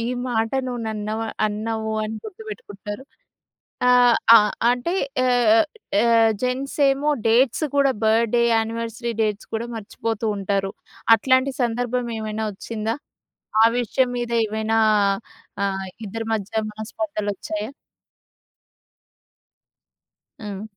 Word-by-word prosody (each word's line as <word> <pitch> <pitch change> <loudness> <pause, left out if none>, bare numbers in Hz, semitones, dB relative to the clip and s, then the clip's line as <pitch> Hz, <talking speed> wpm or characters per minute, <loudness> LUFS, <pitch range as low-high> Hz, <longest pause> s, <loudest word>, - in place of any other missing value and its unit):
ఈ - - -2 0.2
మాట 225 -2 0 0.2
నువ్వు 245 -2 -4
నన్న 215 -1 -4 0.4
అన్నావు 220 +1 -3
అని 215 - -4
గుర్తుపెట్టుకుంటారు. 265 - -8 0.8
ఆహ్, 245 -1 +6 0.2
అ - - +9 0.3
అంటే 245 +8 -1 0.3
యాహ్, 245 -1 +4 0.4
యాహ్, 230 -1 +5
జెంట్స్ 255 +2 -2
ఏమో 280 +2 0 0.2
డేట్స్ 240 +6 +3
కూడా 275 -1 +4
బర్త్‌డే, 230 +2 +3
యానవర్సరీ 230 +1 -2
డేట్స్ 210 -1 -2
కూడా 225 +2 -2
మర్చిపోతూ 225 +1 -4
ఉంటారు. 195 0 -1 0.5
అట్లాంటి 260 +4 +2
సందర్భం 245 +1 -1
ఏమైనా 220 0 -3
వచ్చిందా? 220 +2 -4 0.7
ఆ - - +8
విషయం 250 +2 +1
మీద 240 -1 -3
ఏమైనా 220 +1 -1 0.9
ఆహ్, 195 -1 -2 0.2
ఇద్దరి 225 +3 -5
మధ్య 220 +1 -2
మనస్పర్థలొచ్చాయా? 215 -2 -4 2.7
హ్మ్. 205 -2 -6
225 Hz, 100 wpm, -22 LUFS, 215-245 Hz, 2.7 s, అ